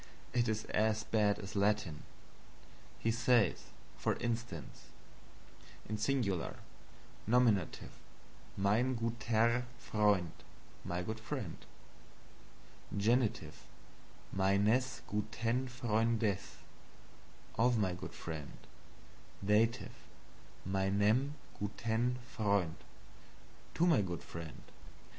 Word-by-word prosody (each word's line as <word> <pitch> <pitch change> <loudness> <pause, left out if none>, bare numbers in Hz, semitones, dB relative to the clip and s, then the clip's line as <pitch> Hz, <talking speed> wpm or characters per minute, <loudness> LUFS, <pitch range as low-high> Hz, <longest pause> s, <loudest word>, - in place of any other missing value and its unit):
It 120 -1 +2
is 110 0 -1
as 110 0 +1
bad 105 -2 +2
as 95 -1 -7
Latin. 100 -6 +1 1.0
He 115 - +1
says, 115 -2 +3 0.3
for - - +1
instance: 115 -8 -4 1.1
SINGULAR 110 -5 0 0.7
Nominative 115 -7 +2 0.7
Mein 110 +7 +2
gutER 115 +1 +1
Freund, 105 -7 +2 0.5
my 90 +1 -2
good 110 +4 -4
friend. 110 - -4 1.4
Genitives 115 +3 +1 0.7
MeinES 100 +7 +2
GutEN 115 +4 -1
FreundES, 115 -4 0 1.0
of 120 0 +4
my 95 -4 +1
good 90 - -7
friend. 80 -4 -6 0.9
Dative 110 +4 +2 0.7
MeinEM 100 +8 +2 0.2
gutEN 115 +4 0
Freund, 100 -8 0 1.0
to 170 - +3
my 165 -11 +5
good 90 -3 -4
friend. 80 -2 -8
110 Hz, 80 wpm, -35 LUFS, 100-120 Hz, 1.4 s, my